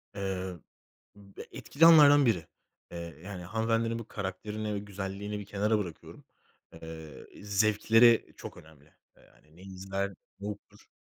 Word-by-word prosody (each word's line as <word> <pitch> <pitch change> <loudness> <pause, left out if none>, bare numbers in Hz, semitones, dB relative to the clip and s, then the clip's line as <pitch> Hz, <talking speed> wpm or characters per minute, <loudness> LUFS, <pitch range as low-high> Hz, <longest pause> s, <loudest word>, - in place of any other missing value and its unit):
Eee, 95 -2 -3 0.6
ıb 100 -1 -18
e - - -7
etkili 165 +3 +2
alanlardan 145 -3 +8
biri. 90 -9 +1 0.4
Eee, 85 - -7 0.3
yani, 95 -2 -7
hanımefendinin 115 +3 0
bu 115 - -9
karakterini 105 +2 -4
ve 100 - -2
güzelliğini 100 +1 -5
bir 100 - -8
kenara 105 +2 0
bırakıyorum. 90 -6 -8 0.6
Eee, 80 -3 -10
i 100 - -14
zevkleri 110 +3 +4
çok - - -9
önemli. 75 -1 -18 0.2
Eee, - - -22
hani 75 +1 -25
ne - - -15
izler? 95 +1 -4 0.3
Ne 100 - -6
okur? 105 -1 -10
100 Hz, 145 wpm, -30 LUFS, 95-110 Hz, 0.6 s, alanlardan